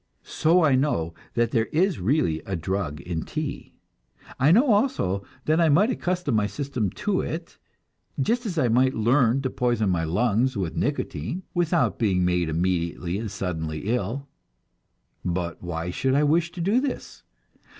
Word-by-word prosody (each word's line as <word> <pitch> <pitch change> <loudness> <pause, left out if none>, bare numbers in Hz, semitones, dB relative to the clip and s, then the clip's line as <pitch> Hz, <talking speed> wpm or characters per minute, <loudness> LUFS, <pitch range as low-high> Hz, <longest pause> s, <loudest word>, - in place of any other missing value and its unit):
So 170 +2 +2
I 145 -4 +4
know 130 - +1 0.2
that 120 -1 +1
there 115 -2 +1
is 180 +3 +1
really 95 - +1
a 95 - -2
drug 85 -3 -3
in 85 -2 -3
tea. - - -5 0.6
I 140 +4 +5
know 240 +7 +5
also 205 - +1 0.2
that 155 +2 +3
I 165 - +4
might 200 - +4
accustom 180 - -1
my 105 -2 +2
system 115 0 -2 0.2
to 200 -3 +2
it, 165 +1 -6 0.6
just 235 - 0
as 175 -5 -4
I 130 - +3
might 130 +3 +3
learn 120 +3 +3
to 130 - -1
poison 120 -5 +1
my 85 -2 0
lungs 115 +8 +1
with 90 -4 -2
nicotine 155 - -2
without 175 -1 +1
being 95 -5 +2
made 90 -2 +1
immediately 85 +2 -1
and 110 -1 -4
suddenly 80 -3 -4
ill; 125 +5 -2 1.0
but 85 -1 -3
why 85 0 -4
should 130 +8 0
I 145 - +4
wish 165 +3 +2
to 175 - -5
do 205 +9 +2
this? 280 -1 -5
120 Hz, 160 wpm, -25 LUFS, -, 1.0 s, I